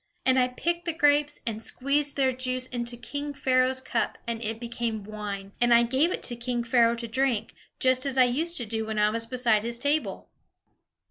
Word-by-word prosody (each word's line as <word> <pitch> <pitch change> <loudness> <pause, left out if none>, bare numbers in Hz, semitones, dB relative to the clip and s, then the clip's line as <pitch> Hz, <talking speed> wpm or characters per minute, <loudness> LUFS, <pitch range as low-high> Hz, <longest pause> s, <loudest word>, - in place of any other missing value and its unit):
And 260 0 +4
I 250 - +3
picked 340 +7 -2
the 335 - 0
grapes, 290 -1 +2
and 220 -1 -3
squeezed 280 +5 0
their 265 -2 +3
juice 255 0 -1
into 240 -1 -3
king 285 +4 -5
Pharaoh's 260 -1 +2
cup, 260 - -2
and 235 0 -3
it 225 +1 -3
became 235 -2 -3
wine; 200 -2 -6
and 240 0 +3
I 235 0 +7
gave 265 +8 +2
it - - -4
to 240 - 0
king 240 0 -2
Pharaoh 235 -1 +3
to 235 0 -4
drink, 235 -2 0 0.3
just 255 +1 +3
as 270 -1 -1
I 255 - +7
used 315 +8 0
to 240 - -2
do 220 0 -3
when 220 -1 -3
I 210 0 +3
was 230 +1 -2
beside 235 -3 +2
his 235 +1 -3
table." 285 +5 -1
245 Hz, 205 wpm, -27 LUFS, 230-265 Hz, 0.3 s, I